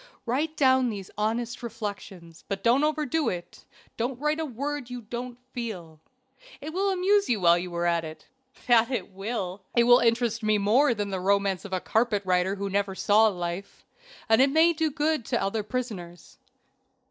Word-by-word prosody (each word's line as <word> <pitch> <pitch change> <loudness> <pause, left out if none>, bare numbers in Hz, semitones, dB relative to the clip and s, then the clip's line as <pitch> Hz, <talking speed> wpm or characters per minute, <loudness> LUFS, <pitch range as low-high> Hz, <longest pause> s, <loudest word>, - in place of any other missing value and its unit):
Write 300 +6 -1
down 260 -2 +4
these 200 -4 -7
honest 230 +3 -2
reflections, 200 -7 -7
but 195 -1 -4
don't 250 +5 +4
overdo 305 0 0
it 175 -1 -7 0.3
don't 245 +2 -2
write 300 +2 0
a 320 - -1
word 280 0 -4
you 250 -1 -6
don't 240 +2 -6 0.2
feel. 180 -10 -6 0.6
It 310 +2 -7
will 390 +2 +1
amuse 390 -1 +2
you 230 -4 +1
while 170 0 +5
you 180 0 -6
are 170 0 -1
at 170 -1 +1
it." 155 -1 -9 0.4
"That 235 -1 +4
it 250 -5 -3
will." 195 -1 -4
"It 235 - +5
will 245 +1 +7
interest 230 -1 +1
me 215 -1 +2
more 235 +6 +3
than 205 -1 -3
the 190 - -2
romance 195 0 +1
of 200 - -8
a 185 - +1
carpet 220 0 0
writer 185 +1 +1
who 200 0 -4
never 195 0 -1
saw 215 +3 +4
life, 175 -1 -5 0.4
and 225 +1 +5
it 270 - +5
may 320 +4 +4
do 320 0 0
good 305 -2 0
to - - 0
other 205 +3 -1
prisoners." 205 -6 -6
225 Hz, 180 wpm, -26 LUFS, 195-260 Hz, 0.6 s, will